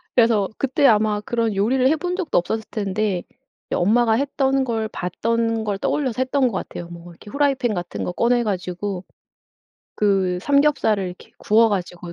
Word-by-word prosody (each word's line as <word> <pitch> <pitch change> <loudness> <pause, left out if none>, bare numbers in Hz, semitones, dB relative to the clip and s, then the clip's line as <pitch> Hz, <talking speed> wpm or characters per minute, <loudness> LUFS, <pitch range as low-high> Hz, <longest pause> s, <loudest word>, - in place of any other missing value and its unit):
그래서 225 -5 +4
그때 275 +1 +1
아마 210 -1 +3
그런 230 -1 -1
요리를 255 +6 +2
해 315 - +3
본 360 +1 -3
적도 370 -5 -1
없었을 220 +5 -1
텐데 200 -2 -1 0.5
예 - - +1
엄마가 225 +5 +3
했던 270 +1 +1
걸 225 -3 -2
봤던 225 +5 -1
걸 205 -2 -2
떠올려서 260 -5 -1
했던 260 0 +2
것 - - -2
같아요. 175 -2 -5
뭐 170 0 -11
이렇게 190 +5 -14
프라이팬 275 -5 +1
같은 175 -1 -4
거 - - -2
꺼내 240 +5 +2
가지고 185 -1 -3 0.9
그 190 -3 +1
삼겹살을 280 -8 +2
이렇게 180 0 -10
구워 225 +2 +4
가지고 175 -3 -4
220 Hz, 345 characters per minute, -22 LUFS, 190-255 Hz, 0.9 s, 그래서